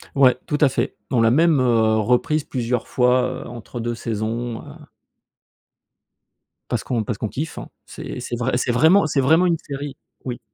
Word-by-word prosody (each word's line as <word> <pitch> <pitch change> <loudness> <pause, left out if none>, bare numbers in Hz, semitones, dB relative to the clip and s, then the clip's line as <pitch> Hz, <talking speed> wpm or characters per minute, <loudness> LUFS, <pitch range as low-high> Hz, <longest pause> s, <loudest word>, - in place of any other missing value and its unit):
Ouais, 130 -3 +5
tout 150 - 0
à 145 - +6
fait. 130 - -2 0.2
On 120 -3 +3
l'a 115 - +5
même, 160 +2 +4
heu, 115 -3 +3
reprise 125 +7 +1
plusieurs 120 -2 -2
fois, 125 +1 +1
heu, - - -10
entre 120 0 -8
2 120 +1 -2
saisons, 115 +1 -3
heu - - -14 2.1
parce - - -1
qu'on 120 -3 -1
parce 110 0 -4
qu'on 110 - -3
kiffe, 155 +9 -5
hein. - - -7 0.2
C'est - - -7
c'est 120 - -4
vrai 125 +1 -1
c'est 125 - 0
vraiment 160 +8 +5
c'est 145 -2 +1
vraiment 160 +7 +4
une 170 - +2
série 140 -2 -7 0.3
oui. 125 -2 -4
125 Hz, 180 wpm, -21 LUFS, 120-140 Hz, 2.1 s, à